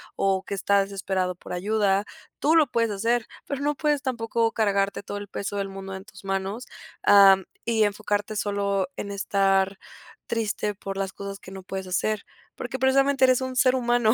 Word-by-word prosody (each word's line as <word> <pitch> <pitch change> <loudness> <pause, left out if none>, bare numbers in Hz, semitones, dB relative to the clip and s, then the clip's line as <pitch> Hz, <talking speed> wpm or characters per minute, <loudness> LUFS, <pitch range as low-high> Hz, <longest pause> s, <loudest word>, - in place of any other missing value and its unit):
o 195 -1 +1
que - - -6
está 200 +1 +3
desesperado 190 -2 -2
por - - -12
ayuda. 200 +1 +1 0.3
Tú 310 +3 +3
lo 315 -3 +6
puedes 230 -1 +1
hacer, 230 +3 0 0.2
pero 280 - -4
no 295 +1 0
puedes 295 -1 +1
tampoco 230 -3 0
cargarte 200 -2 +1
todo 205 - -5
el 205 0 -7
peso 200 0 -4
del 200 -1 -1
mundo 195 0 -7
en 190 +1 -9
tus 195 -2 -15
manos, 195 +5 -2 0.4
am, 195 -1 +7 0.2
y 225 -2 +3
enfocarte 205 0 -1
solo 200 -2 0
en 200 - -4
estar 195 -1 +1 0.5
triste, 210 -2 -1
por 195 0 -6
las 195 -1 -2
cosas 200 0 -7
que 190 - -12
no 190 0 -8
puedes 190 0 -5
hacer. 205 +3 0 0.3
Porque 255 +2 -5
precisamente, 270 +1 +4
eres 255 0 +3
un 260 0 -3
ser 255 0 +4
humano, 240 -3 +3
205 Hz, 185 wpm, -25 LUFS, 195-235 Hz, 0.5 s, am